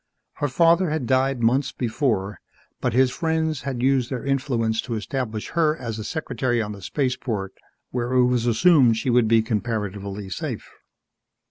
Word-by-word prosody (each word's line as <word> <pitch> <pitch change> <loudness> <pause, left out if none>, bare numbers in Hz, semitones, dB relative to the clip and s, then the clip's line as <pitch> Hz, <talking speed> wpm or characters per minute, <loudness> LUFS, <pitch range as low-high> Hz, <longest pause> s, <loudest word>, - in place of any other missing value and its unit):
Her 145 - 0
father 170 +5 +3
had 155 -4 -2
died 130 -1 +1
months 130 +4 +2
before 110 -5 -1 0.4
but 125 - -1
his 130 +1 +4
friends 160 -2 -1
had 125 -2 -4
used 130 -2 +2
their 130 -2 -4
influence 120 -5 0
to 120 - -4
establish 110 -1 -4
her 160 -2 +1
as 115 -5 -5
a - - -4
secretary 125 -4 -2
on 105 -2 -2
the 100 -1 -9
spaceport 115 -5 -2 0.4
where 120 0 -2
it 125 -1 +5
was 125 -1 +1
assumed 120 -1 +5
she 125 - 0
would 120 -2 +4
be 115 0 +4
comparatively 105 -3 -3
safe. - - -4
125 Hz, 160 wpm, -23 LUFS, 110-135 Hz, 0.4 s, it